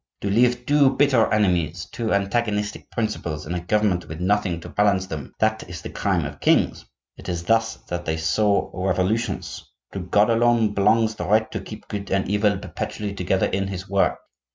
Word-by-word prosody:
To 100 Hz, -, -1 dB
leave 125 Hz, +3 st, +2 dB
two 140 Hz, -1 st, +4 dB
bitter 135 Hz, -5 st, +3 dB
enemies, 90 Hz, -5 st, +1 dB
two 115 Hz, -2 st, -3 dB
antagonistic 105 Hz, +1 st, -1 dB
principles 85 Hz, -9 st, -3 dB
in 80 Hz, -, -4 dB
a 90 Hz, -, -1 dB
government 90 Hz, -1 st, 0 dB
with 80 Hz, +1 st, -7 dB
nothing 95 Hz, -2 st, 0 dB
to -, -, -9 dB
balance 100 Hz, -2 st, +2 dB
them, 75 Hz, -6 st, -7 dB
that 110 Hz, 0 st, +1 dB
is 85 Hz, -2 st, -8 dB
the -, -, -6 dB
crime -, -, 0 dB
of -, -, -7 dB
kings; -, -, +2 dB, 0.3 s
it -, -, -9 dB
is 85 Hz, -1 st, -3 dB
thus 115 Hz, +3 st, +2 dB
that 85 Hz, 0 st, -4 dB
they 80 Hz, 0 st, -1 dB
sow 100 Hz, +6 st, +1 dB
revolutions. 95 Hz, +5 st, -1 dB, 0.3 s
To 100 Hz, -, -4 dB
God 100 Hz, +5 st, +2 dB
alone 115 Hz, -2 st, +3 dB
belongs 110 Hz, +2 st, +3 dB
the 90 Hz, -5 st, -5 dB
right 110 Hz, +2 st, +2 dB
to -, -, -3 dB
keep 110 Hz, 0 st, -10 dB
good 100 Hz, -2 st, -5 dB
and 95 Hz, 0 st, 0 dB
evil 105 Hz, 0 st, +2 dB
perpetually 100 Hz, +1 st, -5 dB
together 95 Hz, 0 st, 0 dB
in 95 Hz, 0 st, -1 dB
his 95 Hz, 0 st, -6 dB
work. 100 Hz, 0 st, +1 dB
100 Hz, 185 wpm, -23 LUFS, 90-110 Hz, 0.3 s, two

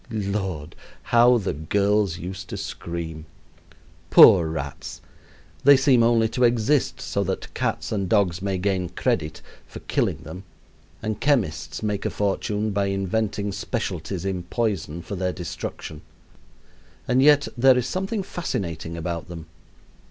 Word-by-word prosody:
Lord! 100 Hz, -8 st, -3 dB, 0.3 s
how 120 Hz, +1 st, +5 dB
the 100 Hz, -4 st, -2 dB
girls 100 Hz, +4 st, +1 dB
used 95 Hz, +3 st, -7 dB
to -, -, -5 dB
scream. 80 Hz, -2 st, -6 dB, 0.8 s
Poor 85 Hz, -2 st, +8 dB
rats! 70 Hz, -3 st, -6 dB, 0.6 s
They 140 Hz, 0 st, +8 dB
seem 130 Hz, -3 st, +4 dB
only 115 Hz, -1 st, +4 dB
to 125 Hz, -, -1 dB
exist 120 Hz, +4 st, +2 dB
so 100 Hz, -, -2 dB
that 95 Hz, +1 st, -4 dB
cats -, -, -2 dB
and 100 Hz, -4 st, -1 dB
dogs 95 Hz, -5 st, +2 dB
may 100 Hz, -1 st, -1 dB
gain 90 Hz, -1 st, -1 dB
credit 75 Hz, -1 st, -2 dB, 0.2 s
for -, -, -10 dB
killing -, -, -1 dB
them 85 Hz, +6 st, -9 dB, 0.6 s
and 110 Hz, -1 st, -3 dB
chemists 80 Hz, -, 0 dB
make 105 Hz, -2 st, -1 dB
a -, -, 0 dB
fortune 105 Hz, +1 st, -1 dB
by 100 Hz, 0 st, 0 dB
inventing 100 Hz, +1 st, -1 dB
specialties 95 Hz, -5 st, -4 dB
in 95 Hz, -2 st, -2 dB
poison 90 Hz, -5 st, -2 dB
for 100 Hz, -, -6 dB
their 90 Hz, 0 st, -1 dB
destruction. 85 Hz, -3 st, -6 dB, 1.1 s
And 125 Hz, +2 st, +3 dB
yet 145 Hz, 0 st, +5 dB
there 130 Hz, +1 st, +5 dB
is 125 Hz, -, 0 dB
something 195 Hz, -, -2 dB
fascinating 95 Hz, -, -4 dB
about 85 Hz, 0 st, -4 dB
them. 85 Hz, -2 st, -8 dB
100 Hz, 135 wpm, -24 LUFS, 85-115 Hz, 1.1 s, Poor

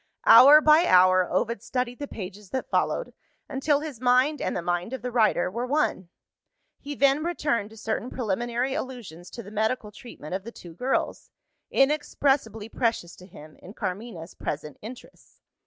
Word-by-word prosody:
Hour 280 Hz, +6 st, +9 dB
by 310 Hz, +3 st, +5 dB
hour, 185 Hz, 0 st, +5 dB
Ovid 205 Hz, +3 st, -1 dB
studied 250 Hz, -1 st, -3 dB
the 285 Hz, -, -5 dB
pages 200 Hz, -2 st, -9 dB
that 260 Hz, -, -5 dB
followed, -, -, -1 dB, 0.3 s
until 285 Hz, +1 st, 0 dB
his 295 Hz, -7 st, -8 dB
mind 255 Hz, +4 st, +2 dB
and -, -, -2 dB
the 175 Hz, -, -4 dB
mind 175 Hz, +6 st, -2 dB
of 260 Hz, -, -6 dB
the 250 Hz, -, -3 dB
writer 215 Hz, -6 st, +2 dB
were 240 Hz, +5 st, -3 dB
one. 265 Hz, -, -1 dB, 0.7 s
He 290 Hz, 0 st, -7 dB
then 280 Hz, +2 st, +2 dB
returned 290 Hz, -11 st, -1 dB
to 220 Hz, -, -15 dB
certain 220 Hz, +3 st, -3 dB
preliminary 240 Hz, +3 st, -2 dB
allusions 210 Hz, -, -7 dB
to 235 Hz, -, -9 dB
the 205 Hz, -, -12 dB
medical 215 Hz, 0 st, -2 dB
treatment 205 Hz, -7 st, -11 dB
of 190 Hz, 0 st, -3 dB
the 235 Hz, -, -8 dB
two 175 Hz, -7 st, -12 dB
girls 250 Hz, +10 st, -2 dB, 0.4 s
inexpressibly 270 Hz, -6 st, 0 dB
precious 225 Hz, -7 st, -2 dB
to 180 Hz, -, -14 dB
him, 155 Hz, -4 st, -14 dB
in 195 Hz, -, -13 dB
Carmina's 185 Hz, -4 st, -6 dB
present 150 Hz, 0 st, -6 dB
interests. 235 Hz, +4 st, -13 dB
235 Hz, 165 wpm, -25 LUFS, 190-265 Hz, 0.7 s, Hour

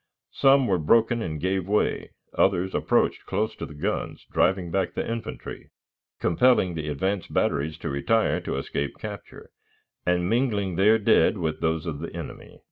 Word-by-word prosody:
Some 135 Hz, -1 st, +4 dB
were 95 Hz, -6 st, +1 dB
broken 115 Hz, +9 st, +3 dB
and 80 Hz, -6 st, -4 dB
gave 95 Hz, +2 st, -1 dB
way; 105 Hz, +1 st, 0 dB, 0.3 s
others 95 Hz, +2 st, +2 dB
approached -, -, +1 dB
close 105 Hz, +3 st, -1 dB
to -, -, -5 dB
the 75 Hz, -, -12 dB
guns, 75 Hz, -, -3 dB
driving 95 Hz, -3 st, +1 dB
back 95 Hz, -1 st, -1 dB
the -, -, -2 dB
infantry, 115 Hz, 0 st, -6 dB, 0.5 s
compelling 95 Hz, -1 st, +3 dB
the 80 Hz, -2 st, -4 dB
advance 95 Hz, +6 st, -2 dB
batteries 75 Hz, +2 st, 0 dB
to -, -, -5 dB
retire 90 Hz, +12 st, +1 dB
to -, -, -3 dB
escape 70 Hz, +1 st, -3 dB
capture, -, -, -9 dB, 0.5 s
and 90 Hz, 0 st, +1 dB
mingling 105 Hz, -5 st, 0 dB
their 105 Hz, +5 st, +5 dB
dead 110 Hz, 0 st, +3 dB
with 80 Hz, -4 st, -3 dB
those 80 Hz, 0 st, 0 dB
of 80 Hz, -4 st, -4 dB
the -, -, -6 dB
enemy. -, -, -9 dB
95 Hz, 160 wpm, -25 LUFS, 80-110 Hz, 0.5 s, their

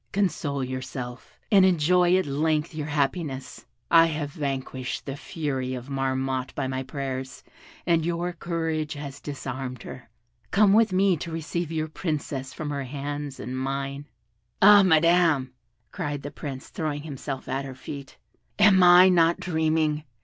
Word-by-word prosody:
Console 170 Hz, -8 st, -1 dB
yourself, 130 Hz, -1 st, -6 dB
and 195 Hz, -3 st, +7 dB
enjoy 180 Hz, 0 st, +4 dB
at 185 Hz, -, 0 dB
length 150 Hz, +3 st, 0 dB
your 150 Hz, -1 st, -4 dB
happiness. 140 Hz, -2 st, -2 dB, 0.2 s
I 165 Hz, 0 st, +7 dB
have 150 Hz, -2 st, -3 dB
vanquished 135 Hz, -4 st, -4 dB
the 135 Hz, -, -4 dB
fury 140 Hz, -5 st, -3 dB
of 125 Hz, +2 st, -8 dB
Marmotte 130 Hz, -1 st, -2 dB
by -, -, -1 dB
my 130 Hz, 0 st, -2 dB
prayers, 130 Hz, -1 st, -5 dB, 0.4 s
and 170 Hz, -2 st, +2 dB
your 175 Hz, +1 st, -2 dB
courage 160 Hz, -2 st, -2 dB
has 140 Hz, -2 st, -8 dB
disarmed 130 Hz, -3 st, -6 dB
her: 125 Hz, -3 st, -10 dB, 0.4 s
come 200 Hz, 0 st, +4 dB
with 220 Hz, -1 st, +4 dB
me 185 Hz, -1 st, +3 dB
to 165 Hz, +3 st, -6 dB
receive 165 Hz, +1 st, -3 dB
your 155 Hz, -1 st, -1 dB
Princess 150 Hz, -5 st, -4 dB
from 150 Hz, -2 st, -5 dB
her 140 Hz, -2 st, -3 dB
hands 145 Hz, +1 st, -5 dB
and 125 Hz, +2 st, -5 dB
mine." 135 Hz, +2 st, -3 dB, 0.5 s
"Ah, 205 Hz, 0 st, +8 dB
Madam," 165 Hz, -6 st, +3 dB, 0.4 s
cried 145 Hz, -1 st, -4 dB
the 145 Hz, -, -6 dB
Prince, 135 Hz, -3 st, -7 dB
throwing 145 Hz, -2 st, -3 dB
himself 140 Hz, -2 st, -6 dB
at 135 Hz, +2 st, -2 dB
her 135 Hz, -1 st, -7 dB
feet, 140 Hz, +1 st, -9 dB, 0.4 s
"am 205 Hz, -2 st, +6 dB
I 180 Hz, +1 st, +8 dB
not 170 Hz, -2 st, +4 dB
dreaming? 160 Hz, -3 st, 0 dB
145 Hz, 150 wpm, -26 LUFS, 135-170 Hz, 0.5 s, Ah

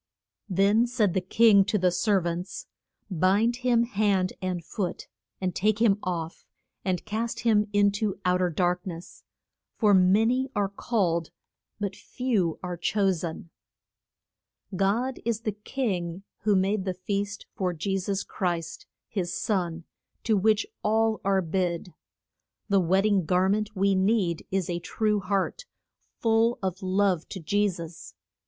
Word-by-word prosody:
Then 200 Hz, +5 st, +3 dB
said 225 Hz, -7 st, +1 dB
the 190 Hz, -, +1 dB
king 200 Hz, +2 st, +5 dB
to 210 Hz, +1 st, +1 dB
the 180 Hz, -2 st, +2 dB
ser 200 Hz, +2 st, +2 dB
vants, 175 Hz, +2 st, -4 dB, 0.5 s
Bind 200 Hz, +7 st, +2 dB
him 245 Hz, -2 st, +2 dB
hand 200 Hz, -5 st, +1 dB
and 180 Hz, -3 st, -3 dB
foot 185 Hz, -1 st, -4 dB, 0.3 s
and 185 Hz, -2 st, -1 dB
take 215 Hz, +2 st, +1 dB
him 210 Hz, -3 st, +4 dB
off, 170 Hz, -2 st, -4 dB, 0.4 s
and 185 Hz, -2 st, -1 dB
cast 220 Hz, +2 st, -3 dB
him 215 Hz, -2 st, +3 dB
in 205 Hz, 0 st, +4 dB
to 205 Hz, -1 st, -2 dB
out 180 Hz, 0 st, +2 dB
er 180 Hz, -, +2 dB
dark 180 Hz, +2 st, 0 dB
ness. 170 Hz, 0 st, -8 dB, 0.5 s
For 210 Hz, -3 st, +3 dB
ma 190 Hz, +3 st, +5 dB
ny 255 Hz, +3 st, +1 dB
are 200 Hz, -1 st, +1 dB
called 185 Hz, -6 st, -1 dB, 0.5 s
but 200 Hz, -2 st, -3 dB
few 215 Hz, -12 st, -1 dB
are 180 Hz, -1 st, -4 dB
cho 195 Hz, +3 st, +1 dB
sen. 170 Hz, -1 st, -5 dB, 1.2 s
God 225 Hz, +8 st, 0 dB
is 230 Hz, -1 st, -1 dB
the 220 Hz, -, -1 dB
king 195 Hz, -5 st, -3 dB, 0.2 s
who 210 Hz, 0 st, +2 dB
made 195 Hz, +1 st, +1 dB
the 185 Hz, -1 st, -2 dB
feast 200 Hz, +2 st, -3 dB
for 185 Hz, -2 st, -1 dB
Je 195 Hz, +4 st, -2 dB
sus 195 Hz, +1 st, -2 dB
Christ, 175 Hz, -4 st, -3 dB, 0.2 s
his 180 Hz, -4 st, -3 dB
son, 175 Hz, -5 st, -1 dB, 0.4 s
to 220 Hz, -, +2 dB
which 215 Hz, +2 st, +3 dB, 0.2 s
all 220 Hz, +1 st, +1 dB
are 195 Hz, -1 st, +2 dB
bid. 175 Hz, 0 st, -2 dB, 0.8 s
The 200 Hz, -1 st, +4 dB
wed 190 Hz, +3 st, +2 dB
ding 200 Hz, -5 st, +2 dB
gar 180 Hz, +3 st, +2 dB
ment 210 Hz, +1 st, -1 dB
we 195 Hz, +1 st, +2 dB
need 190 Hz, -3 st, +1 dB
is 190 Hz, -2 st, -1 dB
a 175 Hz, -1 st, -2 dB
true 210 Hz, +3 st, 0 dB
heart, 200 Hz, -, -1 dB, 0.5 s
full 225 Hz, +1 st, +2 dB
of 190 Hz, +1 st, -2 dB
love 185 Hz, -2 st, +1 dB
to 190 Hz, -, -6 dB
Je 205 Hz, +5 st, +1 dB
sus. 170 Hz, -3 st, -9 dB
195 Hz, 150 wpm, -27 LUFS, 180-215 Hz, 1.2 s, king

